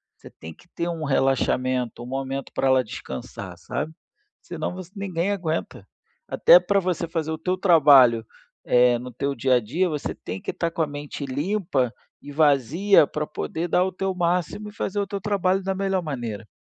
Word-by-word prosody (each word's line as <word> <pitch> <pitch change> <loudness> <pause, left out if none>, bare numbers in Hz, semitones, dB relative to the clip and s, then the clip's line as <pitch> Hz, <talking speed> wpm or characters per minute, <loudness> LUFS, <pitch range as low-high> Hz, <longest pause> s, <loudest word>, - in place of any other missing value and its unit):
Você - - -14
tem 80 +1 -11
que 175 - -22
ter 170 - -3
um 165 -2 -4
relaxamento, 130 -3 0
um - - -8
momento 135 +1 -4
pra 135 - 0
ela 130 -1 +4
descansar, 65 - -8
sabe, 155 - -4 0.5
senão - - -5
você 185 -1 -9
ninguém 190 -1 -2
aguenta. 170 -5 -3 0.4
Até - - +6
para 200 - +1
você 180 -2 -2
fazer 160 -1 -3
o 160 - -2
teu 180 +4 -1
trabalho, 140 - +6 0.4
eh, 125 0 +4
no 125 +1 -8
teu 140 +4 -2
dia 130 +1 +2
a - - +4
dia, 150 - -1
você 150 -3 -4
tem 90 +2 -7
que - - -7
estar 170 -1 -2
com 165 - -3
a 160 - +1
mente 145 0 -7
limpa 145 - -1 0.3
e 145 - -10
vazia 150 - +4
pra 150 +1 -4
poder 165 +2 -4
dar 180 +1 +3
o 190 - -2
teu 190 +1 -3
máximo 180 +4 -1
e - - -15
fazer 205 -1 -3
o 200 - 0
teu 200 0 -5
trabalho 195 -2 +1
da 190 0 -1
melhor 195 -1 0
maneira. 120 -9 -5
155 Hz, 190 wpm, -24 LUFS, 130-185 Hz, 0.5 s, Até